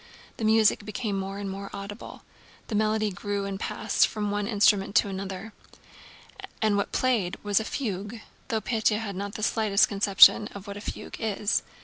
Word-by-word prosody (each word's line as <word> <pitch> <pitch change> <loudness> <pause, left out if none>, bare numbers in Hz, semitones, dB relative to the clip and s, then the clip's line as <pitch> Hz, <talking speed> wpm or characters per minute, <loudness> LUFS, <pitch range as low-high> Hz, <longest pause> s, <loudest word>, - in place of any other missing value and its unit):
The 225 - -2
music 220 -1 +4
became 210 0 -3
more 195 +1 -5
and 200 0 -5
more 195 +1 -6
audible. 200 +2 -9 0.5
The - - -4
melody 215 0 +1
grew 200 +2 -3
and 195 -1 -4
passed 220 -1 +1
from 210 -2 -3
one 205 0 -1
instrument 205 -2 +2
to 205 - +4
another. 195 +2 -6 1.1
And 215 -2 +2
what 200 - 0
was - - -1
played 225 -8 +1
was 205 0 +2
a - - -3
fugue—though 220 -1 -5
Pétya 220 -2 +1
had 210 -3 -5
not 200 +1 -5
the 215 - 0
least 205 -2 +4
conception 200 +1 +6
of 200 -1 -8
what 200 -1 -7
a - - -8
fugue - - -7
is. 210 -1 0
205 Hz, 175 wpm, -26 LUFS, 200-220 Hz, 1.1 s, conception